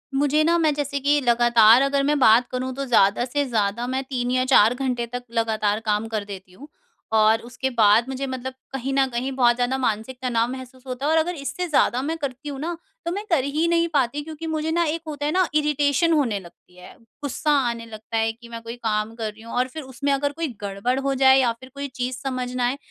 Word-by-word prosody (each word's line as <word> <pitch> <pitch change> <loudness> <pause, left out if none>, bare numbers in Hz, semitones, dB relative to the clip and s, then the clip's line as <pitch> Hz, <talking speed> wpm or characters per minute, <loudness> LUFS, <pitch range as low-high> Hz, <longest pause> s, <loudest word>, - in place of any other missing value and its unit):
मुझे 290 +2 +2
ना 340 +2 +3
मैं 310 -3 +2
जैसे 280 -1 -2
कि 290 +2 +2
लगातार 240 -1 +5
अगर 275 0 +1
मैं 295 +1 +2
बात 240 0 +5
करूँ 255 0 -3
तो 275 +1 -3
ज़्यादा 225 -1 +3
से 285 +3 -1
ज़्यादा 220 +1 0
मैं 260 +1 -2
3 250 -2 -3
या 255 0 +2
4 240 -3 +5
घंटे 250 -2 -2
तक 245 0 -4
लगातार 220 -2 0
काम 210 +1 0
कर 215 -2 -3
देती 190 -2 -10
हूँ 280 +10 -13 0.5
और 220 +1 +4
उसके 245 +2 -4
बाद 215 +1 +5
मुझे 265 +1 -3
मतलब 260 0 -5 0.2
कहीं 270 +1 -3
न 270 0 +3
कहीं 255 +3 -2
बहुत 240 -2 +4
ज़्यादा 245 +2 0
मानसिक 245 0 -2
तनाव 240 -2 0
महसूस 260 -1 -9
होता 255 +2 -4
है 305 - +2
और 320 - +3
अगर 345 +2 +1
इससे 310 +5 -4
ज़्यादा 260 -4 +2
मैं 320 +4 -3
करती 280 0 -5
हूँ 275 -1 -6
ना 335 +3 -3 0.3
तो 340 - -1
मैं 405 +4 -3
कर 305 -7 +2
ही 305 +4 0
नहीं 335 0 +2
पाती 280 +1 +1
क्योंकि 320 +1 -7
मुझे 315 0 -2
ना 340 +1 +2
एक 320 +2 -2
होता 290 -1 -4
है 300 - 0
ना 370 0 +2
इरिटेशन 300 +2 +2
होने 245 -9 +1
लगती 180 0 -18
है। 180 - -13 0.3
ग़ुस्सा 300 +2 -1 0.2
आने 230 -1 -5
लगता 220 0 -6
है 225 0 +1
कि 235 +1 -15
मैं 230 0 -7
कोई 230 +1 -7
काम 220 -2 -2
कर 220 -2 -4
रही 220 - -17
हूँ 230 +1 -10
और 250 +1 +1
फिर 310 +4 -8
उसमें 265 +2 -3
अगर 285 +1 0
कोई 325 +2 -3
गड़बड़ 205 +6 -1
हो 275 0 -1
जाए 265 0 +6
या 245 -3 +3
फिर 260 - -13
कोई 280 0 -4
चीज़ 250 0 -3
समझ 255 -2 -3
ना 245 -1 +1
आए 260 +3 -2
255 Hz, 240 wpm, -23 LUFS, 230-285 Hz, 0.5 s, जाए